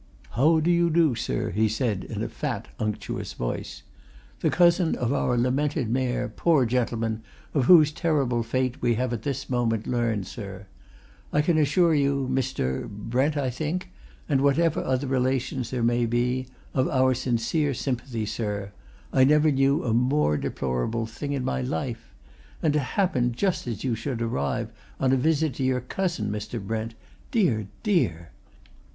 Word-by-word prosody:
"How 155 +8 +4
do 165 +3 +2
you 170 0 +3
do, 165 -4 +3
sir?" 60 - -2
he 110 +4 +2
said 110 -4 -1
in - - -4
a - - -1
fat, - - -4
unctuous 105 -1 -3
voice. - - -4 0.6
"The - - +1
cousin 175 -1 +4
of 120 +2 -1
our 125 -3 +1
lamented 130 +1 0
Mayor, 125 0 0
poor 140 +4 +2
gentleman, 115 -2 -1 0.3
of 140 -5 +2
whose 155 -2 +7
terrible 145 -7 0
fate 130 +2 -1
we 120 -1 +2
have 125 +1 -1
this 135 +1 -3
moment 115 -3 0
learned, 115 -5 0
sir. 100 -1 -8 0.7
I 150 - +2
can 160 0 +2
assure 160 +3 +3
you, 140 -2 +1
Mr. 65 - -1
Brent, 125 +8 -1
I 135 -3 0
think? 160 +8 -3 0.4
and 140 -4 +2
whatever 155 +3 +2
other 130 +1 0
relations 130 -1 0
there 125 -2 -2
may 120 0 +2
be, 125 +2 0 0.3
of 130 -1 +2
our 130 0 +3
sincere 130 +4 0
sympathy, 120 -3 -3
sir 105 -2 -3 0.4
I 130 - +5
never 150 +3 +5
knew 135 +2 +2
a 115 - 0
more 125 - +2
deplorable 70 - -2
thing 140 +6 -6
in 135 -3 -2
my 65 0 -1
life. 115 - -4 0.5
And 155 -3 +3
to 150 - +3
happen 130 -4 0
just 180 +3 -1
as 115 -3 -4
you 130 -3 0
should 120 +2 -3
arrive 70 -12 -2 0.3
on 130 -1 +2
a - - +5
visit 155 +2 +1
to 135 - -1
your 130 -1 +1
cousin, 175 - -2
Mr. 105 +2 -4
Brent 110 +2 -4 0.3
dear, 135 - +1 0.2
dear! 85 - 0
130 Hz, 160 wpm, -26 LUFS, 115-145 Hz, 0.7 s, whose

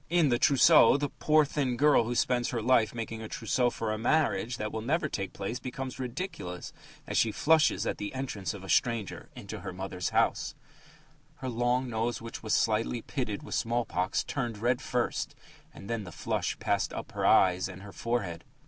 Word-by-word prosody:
In 170 -3 +3
The 120 -1 +2
Trousseau, 145 -2 +6
the 145 0 -2
poor 155 0 +3
thin 135 -4 -1
girl 145 -4 +5
who 120 +2 -2
spends 120 0 +1
her 120 - -2
life 120 -2 +3
making 115 -1 -5
a 110 - -6
trousseau 120 +3 0
for 110 -2 -3
a 110 - -4
marriage 125 -2 +1
that 105 0 -3
will 110 - -3
never 155 +7 0
take 100 -9 -4
place 105 +5 -4
becomes 130 0 -6
ridiculous 125 - -5 0.3
as - - 0
she 110 - +3
flushes 160 +7 +3
at - - -2
the 105 - -4
entrance 110 -7 -3
of 95 - -10
a - - -8
stranger 115 -2 0
into - - -7
her 95 - -6
mother's 90 0 -4
house: - - +1 0.8
Her 130 - -5
long 120 +2 +1
nose, 115 0 -1
which 115 0 -8
was 110 - +1
slightly 115 +2 +1
pitted 120 -8 -3
with - - -7
small 120 +1 0
pox, 90 +2 -1
turned 120 -5 -3
red 120 +3 +1
first, 125 -1 -2 0.4
and 100 - -11
then 115 -1 -2
the 90 - -9
flush - - -2
passed - - 0
up - - -6
to - - -17
her - - -1
eyes 95 0 +4
and 95 +1 -10
her 100 - -9
forehead. 100 -8 -2
115 Hz, 200 wpm, -29 LUFS, 105-130 Hz, 0.8 s, Trousseau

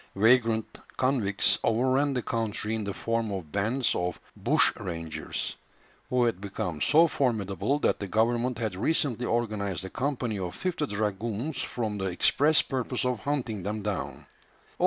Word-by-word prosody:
Vagrant 115 +1 +3 0.2
convicts 105 -6 +2
overran 130 +4 +2
the 125 - -1
country 110 -1 -1
in 110 -1 -1
the 100 - -2
form 115 -2 -1
of 90 -6 -5
bands 115 +5 +1
of 90 0 -2 0.2
"bushrangers," 85 -3 0 0.5
who 125 -1 +2
had 115 -6 0
become 90 -6 -4
so 165 +3 +5
formidable 110 - 0
that - - +1
the 100 - -4
government 120 +4 +1
had 110 -4 -2
recently 125 - 0
organized 105 -6 -1
a 95 - -7
company 125 -6 -2
of 90 -2 -4
fifty 170 -5 -2
dragoons 110 +6 -2
for 120 -3 -2
the 100 -2 -3
express 145 - +4
purpose 130 -1 -2
of 125 -3 -1
hunting 125 -8 -1
them 105 +3 -3
down. 105 -1 -4
115 Hz, 145 wpm, -28 LUFS, 100-125 Hz, 0.5 s, so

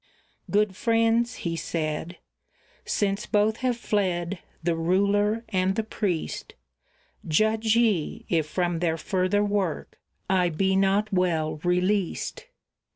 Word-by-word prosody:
"Good 205 -1 +2
friends," 230 +1 +2
he 165 -1 -1
said, 160 +1 -3 0.7
"since 200 0 -1
both 215 +1 +2
have 255 -2 0
fled, 185 -5 -1 0.2
the 170 0 +1
ruler 200 +6 +1
and 190 -1 +1
the 220 - 0
priest, 200 -6 -3 0.7
Judge 220 +6 +2
ye, 215 -10 +1
if 160 -3 +1
from 175 +1 -1
their 165 -1 0
further 185 +4 +1
work 200 -5 -2 0.3
I 185 -2 +2
be 190 +4 +1
not 195 +2 +2
well 165 -4 +1
released." 180 - -1
190 Hz, 115 wpm, -26 LUFS, 175-210 Hz, 0.7 s, Good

